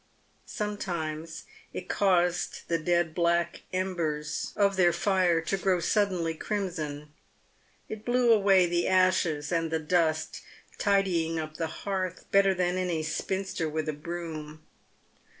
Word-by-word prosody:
Sometimes 165 Hz, -7 st, -4 dB, 0.3 s
it -, -, -6 dB
caused 180 Hz, -3 st, +1 dB
the 165 Hz, -1 st, 0 dB
dead 170 Hz, 0 st, +1 dB
black 170 Hz, 0 st, +1 dB
embers 170 Hz, -5 st, -2 dB
of 200 Hz, -1 st, +3 dB
their 175 Hz, -2 st, +4 dB
fire 180 Hz, -1 st, +2 dB
to 195 Hz, +4 st, -1 dB
grow 185 Hz, -1 st, +1 dB
suddenly 180 Hz, -2 st, +1 dB
crimson. 155 Hz, -6 st, -4 dB, 0.7 s
It 215 Hz, -1 st, -7 dB
blew 245 Hz, -1 st, +4 dB
away 195 Hz, -3 st, +5 dB
the 175 Hz, 0 st, 0 dB
ashes 185 Hz, -5 st, +2 dB
and 165 Hz, -1 st, 0 dB
the 160 Hz, -, 0 dB
dust, 160 Hz, 0 st, 0 dB, 0.4 s
tidying 185 Hz, -5 st, +1 dB
up 155 Hz, -1 st, -5 dB
the 165 Hz, -, -1 dB, 0.2 s
hearth 185 Hz, -2 st, -2 dB
better 195 Hz, -1 st, +4 dB
than 180 Hz, 0 st, 0 dB
any 175 Hz, -4 st, -1 dB
spinster 190 Hz, 0 st, -2 dB
with 155 Hz, 0 st, -3 dB
a 155 Hz, -, -1 dB
broom. 155 Hz, -1 st, -7 dB
175 Hz, 130 wpm, -28 LUFS, 160-190 Hz, 0.7 s, away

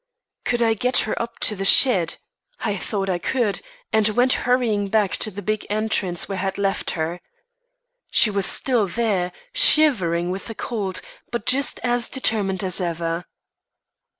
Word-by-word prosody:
Could 240 Hz, -1 st, +1 dB
I 225 Hz, -1 st, +3 dB
get 250 Hz, +4 st, 0 dB
her 215 Hz, -, -4 dB
up 235 Hz, 0 st, -5 dB
on -, -, -28 dB
to 210 Hz, -, +1 dB
the 195 Hz, -, -4 dB
shed? 195 Hz, -5 st, +5 dB, 0.5 s
I 205 Hz, -, -1 dB
thought 195 Hz, 0 st, -3 dB
I 180 Hz, -2 st, -1 dB
could, 230 Hz, -1 st, -1 dB, 0.3 s
and 220 Hz, -1 st, +4 dB
went 245 Hz, +4 st, +2 dB, 0.2 s
hurrying 225 Hz, -5 st, +1 dB
back 210 Hz, -2 st, +1 dB
to -, -, -1 dB
the 205 Hz, 0 st, -9 dB
big 215 Hz, +2 st, -2 dB
entrance 205 Hz, -4 st, -1 dB
where 195 Hz, -2 st, -4 dB
I -, -, -2 dB
had 195 Hz, 0 st, -3 dB
left 195 Hz, -1 st, -1 dB
her. 165 Hz, +2 st, -3 dB, 0.9 s
She 215 Hz, -, +5 dB
was 200 Hz, -1 st, 0 dB
still 240 Hz, -6 st, +1 dB
there, 190 Hz, -3 st, -1 dB, 0.2 s
shivering 190 Hz, -, +4 dB
with 190 Hz, +1 st, -6 dB
the 225 Hz, -, -7 dB
cold, 205 Hz, -6 st, -4 dB, 0.3 s
but 235 Hz, -2 st, -4 dB
just 275 Hz, +2 st, +2 dB
as 245 Hz, -1 st, 0 dB
determined 205 Hz, -7 st, -1 dB
as 185 Hz, 0 st, -1 dB
ever. 170 Hz, 0 st, -3 dB
205 Hz, 170 wpm, -22 LUFS, 185-235 Hz, 0.9 s, shed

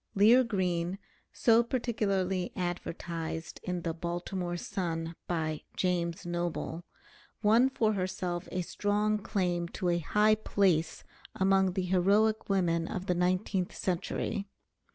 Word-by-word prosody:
Lear 225 Hz, +6 st, +7 dB
Green, 185 Hz, -5 st, -1 dB, 0.3 s
so 230 Hz, -1 st, +4 dB
particularly 200 Hz, -7 st, -1 dB
advertised 170 Hz, -2 st, -4 dB
in 180 Hz, -1 st, -3 dB
the 165 Hz, -, -1 dB
"Baltimore 175 Hz, +1 st, -3 dB
Sun" 165 Hz, -2 st, -3 dB
by 155 Hz, -3 st, -1 dB, 0.2 s
"James 175 Hz, -1 st, 0 dB
Noble," 175 Hz, -1 st, -3 dB, 0.6 s
won 230 Hz, +5 st, +5 dB
for 220 Hz, -5 st, +1 dB
herself 185 Hz, -2 st, -2 dB
a 180 Hz, -1 st, -1 dB
strong 210 Hz, +3 st, 0 dB
claim 180 Hz, -4 st, -1 dB
to 180 Hz, +1 st, -2 dB
a 175 Hz, 0 st, +2 dB
high 210 Hz, +6 st, +3 dB
place 190 Hz, -6 st, +1 dB, 0.3 s
among 190 Hz, -1 st, +3 dB
the 190 Hz, 0 st, -1 dB
heroic 200 Hz, +5 st, +2 dB
women 170 Hz, -4 st, +1 dB
of 185 Hz, -, -4 dB
the 180 Hz, -, +1 dB
nineteenth 180 Hz, +1 st, 0 dB
century. 195 Hz, +3 st, -2 dB
185 Hz, 120 wpm, -30 LUFS, 175-205 Hz, 0.6 s, Lear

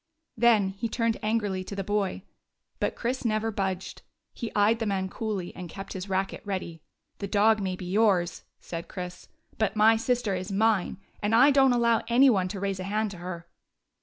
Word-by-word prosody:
Then 225 Hz, -4 st, +4 dB
he 200 Hz, +4 st, -4 dB
turned 230 Hz, -1 st, 0 dB
angrily 210 Hz, -4 st, -1 dB
to 200 Hz, -, -7 dB
the 195 Hz, -, -3 dB
boy. 205 Hz, -1 st, -1 dB, 0.6 s
But -, -, -1 dB
Chris 250 Hz, +2 st, -2 dB
never 220 Hz, -1 st, 0 dB
budged. 190 Hz, -2 st, -3 dB, 0.3 s
He 235 Hz, -3 st, -5 dB
eyed 210 Hz, +3 st, +3 dB
the 225 Hz, -, -1 dB
man 190 Hz, -1 st, -1 dB
coolly 205 Hz, -4 st, -4 dB
and 180 Hz, -2 st, -7 dB
kept 195 Hz, +3 st, -8 dB
his 190 Hz, +1 st, -6 dB
racket 195 Hz, 0 st, -1 dB
ready. 185 Hz, -5 st, -4 dB, 0.4 s
"The 200 Hz, -, -3 dB
dog 215 Hz, +2 st, +3 dB
may 190 Hz, -1 st, -2 dB
be 180 Hz, -, -8 dB
yours," 185 Hz, -3 st, +2 dB, 0.2 s
said 170 Hz, -1 st, -7 dB
Chris, 180 Hz, -1 st, -7 dB, 0.3 s
"but 220 Hz, -, +1 dB
my 220 Hz, +1 st, +5 dB
sister 235 Hz, -2 st, 0 dB
is 185 Hz, +2 st, -4 dB
mine. 210 Hz, -2 st, +1 dB, 0.2 s
And 210 Hz, +1 st, +2 dB
I 265 Hz, +5 st, +7 dB
don't 270 Hz, -1 st, +5 dB
allow 235 Hz, -2 st, +3 dB
any 255 Hz, +3 st, +6 dB
one 190 Hz, -4 st, +1 dB
to 195 Hz, +1 st, -5 dB
raise 195 Hz, -1 st, -2 dB
a 185 Hz, -, -4 dB
hand 215 Hz, +1 st, -1 dB
to 190 Hz, -, -9 dB
her." 170 Hz, -1 st, -7 dB
205 Hz, 190 wpm, -27 LUFS, 190-225 Hz, 0.6 s, I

